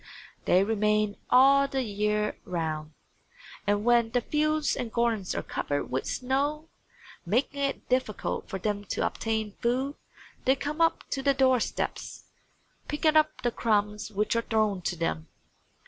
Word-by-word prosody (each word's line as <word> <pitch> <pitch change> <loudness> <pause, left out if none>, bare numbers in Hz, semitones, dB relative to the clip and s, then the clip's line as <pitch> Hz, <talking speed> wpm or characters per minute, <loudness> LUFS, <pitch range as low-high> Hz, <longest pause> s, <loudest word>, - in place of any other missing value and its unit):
They 185 +2 +4
remain 210 -1 +1
all 275 +2 +6
the 270 -1 -1
year 210 -1 0
round, 160 -3 -3 0.7
and 205 +1 +1
when 240 -1 +4
the 245 +1 +1
fields 305 +2 +1
and 240 -3 -4
gardens 230 -5 0
are - - -2
covered 145 0 -3
with 130 - -2
snow, 285 +5 -1 0.5
making 250 +9 0
it 275 0 -2
difficult 255 -5 -1
for 190 - -3
them 205 +1 -2
to - - -1
obtain 220 -2 -2
food 260 +4 0 0.5
they 265 - +5
come 295 +4 -3
up 330 - +2
to 270 - -1
the 275 0 +2
door 260 -1 +4
steps, - - -4 0.6
picking 305 +1 +1
up 310 0 +3
the 240 - +1
crumbs 210 -2 0
which 210 +2 0
are 230 - +2
thrown 215 -4 0
to 175 - -2
them. 80 - -2
230 Hz, 150 wpm, -28 LUFS, 205-270 Hz, 0.7 s, all